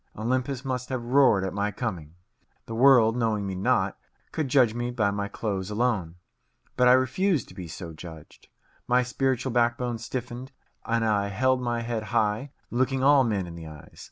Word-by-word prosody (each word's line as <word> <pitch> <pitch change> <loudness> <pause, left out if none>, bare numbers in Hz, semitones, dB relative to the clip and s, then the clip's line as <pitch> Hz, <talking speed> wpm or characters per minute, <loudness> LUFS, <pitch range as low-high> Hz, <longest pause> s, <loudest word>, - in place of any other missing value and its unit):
Olympus 130 +4 -2
must 125 -1 -3
have 130 -3 -3
roared 125 -5 +4
at 95 - -3
my 100 +1 -1
coming. 90 -8 -5 0.5
The 115 - -7
world, 120 -2 +5
knowing 110 -4 0
me 95 - -3
not, 95 +1 0 0.3
could 155 -3 -2
judge 125 -4 +4
me 120 +1 -3
by 110 -5 0
my 100 0 -2
clothes 100 -2 -4
alone. 105 -7 -1 0.6
But 125 - +4
I 125 - +8
refused 130 - +1
to - - -13
be 90 -3 -8
so 85 +1 -8
judged. 80 -1 -12 0.4
My 125 +1 +3
spiritual 130 0 -1
backbone 120 0 0
stiffened, 125 +2 -6 0.3
and 115 0 +1
I 105 -2 +1
held 130 +6 +1
my 120 -1 -1
head 115 -2 -3
high, 110 +3 0 0.2
looking 130 +2 0
all 140 -1 +6
men 105 -6 -1
in 85 - -9
the 85 -1 -9
eyes. 75 -2 -13
120 Hz, 180 wpm, -26 LUFS, 100-130 Hz, 0.6 s, I